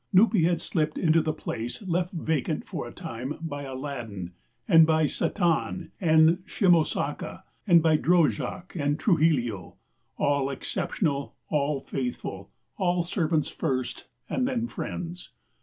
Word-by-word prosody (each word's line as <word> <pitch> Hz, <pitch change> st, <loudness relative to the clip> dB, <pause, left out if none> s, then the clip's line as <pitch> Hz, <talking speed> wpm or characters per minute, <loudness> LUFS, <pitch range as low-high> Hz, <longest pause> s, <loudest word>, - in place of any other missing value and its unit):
Nupee 205 Hz, 0 st, +5 dB
had 170 Hz, -1 st, +1 dB
slipped 155 Hz, -2 st, -1 dB
into 165 Hz, -1 st, +4 dB
the 155 Hz, -, 0 dB
place 120 Hz, -, -5 dB
left 180 Hz, -1 st, -1 dB
vacant 160 Hz, -5 st, -1 dB
for -, -, -5 dB
a -, -, -9 dB
time 125 Hz, +5 st, -6 dB
by 150 Hz, -3 st, -5 dB
Aladdin, 120 Hz, -9 st, -6 dB, 0.4 s
and 165 Hz, -1 st, +7 dB
by 160 Hz, 0 st, +3 dB
Satán 170 Hz, +1 st, 0 dB
and 160 Hz, 0 st, +5 dB
Shimosaka, 175 Hz, -6 st, +1 dB, 0.2 s
by 165 Hz, -3 st, +5 dB
Drojak 170 Hz, 0 st, +1 dB
and 145 Hz, -2 st, 0 dB
Trujillo 145 Hz, -, +1 dB, 0.4 s
all 140 Hz, -1 st, +1 dB
exceptional, 140 Hz, +1 st, -2 dB
all 145 Hz, -2 st, 0 dB
faithful, 120 Hz, -8 st, -4 dB, 0.3 s
all 180 Hz, -3 st, +1 dB
servants 165 Hz, -4 st, 0 dB
first 130 Hz, -2 st, -3 dB, 0.2 s
and 255 Hz, -, 0 dB
then 245 Hz, -3 st, -1 dB
friends. 175 Hz, -, -6 dB
160 Hz, 125 wpm, -27 LUFS, 140-175 Hz, 0.4 s, and